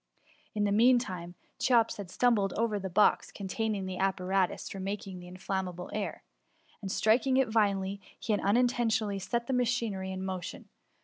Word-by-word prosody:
In 210 - +1
the 205 - +2
mean 240 +5 +6
time, 180 -7 -5 0.2
Cheops 235 -3 +3
had 200 -4 -7
stumbled 205 -3 +2
over 220 -2 0
the 190 -1 -4
box 205 +4 +3
containing 205 0 -2
the 185 -1 -5
apparatus 190 -1 0
for 195 - -6
making 195 -1 -5
inflammable 180 0 -4
air, 210 -1 -3 0.6
and 195 -2 -4
striking 245 +6 +3
it 265 -3 +3
violently, 200 -3 +1 0.3
had 210 -2 +2
unintentionally 220 -2 +2
set 235 +5 -2
the 265 - -2
machinery 230 -6 0
in 190 0 -4
motion. 185 -2 -5
200 Hz, 150 wpm, -30 LUFS, 190-230 Hz, 0.6 s, mean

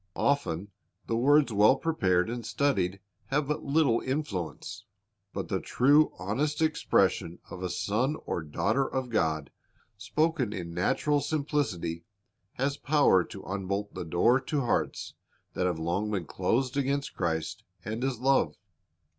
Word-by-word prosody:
Often 100 - 0 0.3
the 115 - -1
words 140 +1 +4
well 105 +5 +6
prepared 100 - +1
and 120 +1 -4
studied 105 -8 0 0.3
have 145 +1 0
but 150 - -2
little 140 -5 +3
influence. 95 - -4 0.5
But - - -4
the - - -1
true, 145 +5 +4
honest 130 +11 -1
expression 155 - +1
of 90 - -7
a 90 - -2
son 125 - 0
or - - -2
daughter 110 - 0
of 130 -2 -2
God, 80 -8 0 0.5
spoken 150 0 0
in 85 -4 -5
natural 145 - +1
simplicity, 115 - -1 0.5
has 140 +2 -1
power 140 -13 +4
to 95 - -10
unbolt 100 +1 -3
the - - -5
door 90 +10 +3
to 145 +2 -1
hearts 120 - -1 0.4
that 90 - 0
have 90 -3 -1
long 85 +6 -1
been 95 -5 -2
closed 125 - 0
against 140 0 -1
Christ 85 +4 -2 0.2
and 110 +3 -3
His 130 -3 -1
love. 135 +2 +2
115 Hz, 140 wpm, -29 LUFS, 95-140 Hz, 0.5 s, well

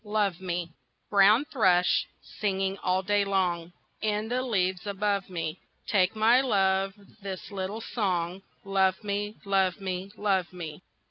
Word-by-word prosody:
Love 205 -4 0
Me 175 -2 -2 0.4
Brown 205 +7 +6
thrush 185 -11 +3 0.3
singing 195 -2 0
all 185 +1 +1
day 205 +1 +2
long 180 -4 0 0.3
In 215 0 -1
the 250 +1 0
leaves 190 -6 0
above 200 -1 -1
me, 165 -3 -4 0.3
Take 195 0 +2
my 230 +4 +5
love 195 -5 +2 0.3
this 195 -1 -6
April 200 +3 -4
song, 185 -5 -1 0.2
"Love 190 0 +2
me, 205 +1 -2
love 195 0 +2
me, 190 0 -4
love 190 -4 +1
me!" 165 -3 -7
195 Hz, 135 wpm, -28 LUFS, 185-210 Hz, 0.4 s, Brown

